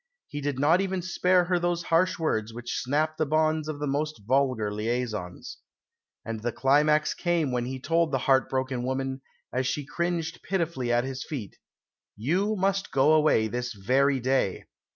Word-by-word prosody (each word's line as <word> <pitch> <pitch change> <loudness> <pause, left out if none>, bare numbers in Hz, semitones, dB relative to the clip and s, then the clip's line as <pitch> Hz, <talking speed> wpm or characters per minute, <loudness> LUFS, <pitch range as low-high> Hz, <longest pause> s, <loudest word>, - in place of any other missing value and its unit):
He 145 - -5
did 145 -2 -2
not 155 +7 +4
even 190 -2 -2
spare 180 0 +3
her 180 0 +1
those 175 0 -1
harsh 180 +3 +2
words 115 -9 -1
which 120 0 -5
snap 155 +4 0
the 155 - +1
bonds 155 0 +1
of 155 -2 -4
the 145 - -3
most 145 -4 -2
vulgar 125 -4 +1
liaisons." 110 -4 -3 0.7
And 115 -1 -4
the 120 +1 -1
climax 150 +4 +3
came 170 -6 0
when 120 -1 -1
he 130 0 -5
told 165 +3 +1
the 135 - +2
heart 135 -1 +3
broken 130 -1 -1
woman, 130 +1 -2 0.3
as 130 +1 0
she 145 +1 -2
cringed 170 +2 -2
pitifully 165 -10 -1
at 120 0 +3
his 135 0 -4
feet, 120 -10 -6 0.6
"You 185 - 0
must 195 0 0
go 140 +3 +4
away 150 -8 +4
this 125 +2 -3
very 130 +7 +2
day." 130 -6 0
140 Hz, 170 wpm, -27 LUFS, 125-165 Hz, 0.7 s, not